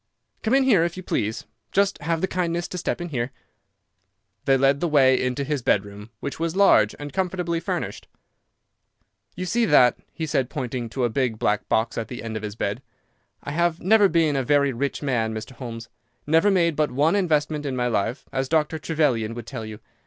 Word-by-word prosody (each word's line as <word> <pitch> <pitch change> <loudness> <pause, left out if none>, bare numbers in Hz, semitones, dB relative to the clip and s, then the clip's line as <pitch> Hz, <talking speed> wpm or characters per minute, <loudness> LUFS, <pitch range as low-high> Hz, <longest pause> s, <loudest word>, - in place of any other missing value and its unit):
"Come 230 +4 +2
in 275 - +4
here, 215 -11 +4
if 170 +1 -2
you 185 - -6
please. 110 -7 -2 0.3
Just 200 0 +1
have 165 +1 -1
the 190 - +1
kindness 175 -2 -1
to 180 - -5
step 175 - -2
in 175 - -4
here." 125 -4 -2 1.2
He 135 -1 +5
led 135 +1 +3
the 175 - 0
way 135 -4 +4
into 130 +2 -1
his 145 -1 -2
bedroom, 105 -1 -1
which 140 - -5
was 165 +1 -1
large 110 - +5
and 145 -1 -8
comfortably 180 -3 -1
furnished. 170 - -4 1.3
"You 185 - -4
see 235 +6 +1
that," 125 - +5 0.3
said 135 -3 0
he, - - -19
pointing 125 -4 -4
to 130 +3 -3
a 120 - +2
big 125 -3 0
black 105 -1 0
box 115 +1 +1
at 115 - -4
the 125 - -7
end 115 -1 -5
of 110 - -3
his 105 -1 -6
bed. 105 +2 -2 0.6
"I - - -5
have 170 +2 +1
never 205 +2 +5
been 160 -3 +2
a 135 - +1
very 140 +1 +2
rich 140 +5 -3
man, 115 -5 0
Mr. 110 +3 -6
Holmes—never 125 - -2
made 170 -5 +2
but 150 0 +1
one 145 +8 +2
investment 155 -5 +1
in 135 - -2
my 125 -1 0
life, 115 +2 -1
as 130 0 -2
Dr. 160 0 +1
Trevelyan 135 -9 0
would 120 -2 -7
tell 115 -4 -6
you. 105 -1 -8
140 Hz, 200 wpm, -24 LUFS, 120-170 Hz, 1.3 s, He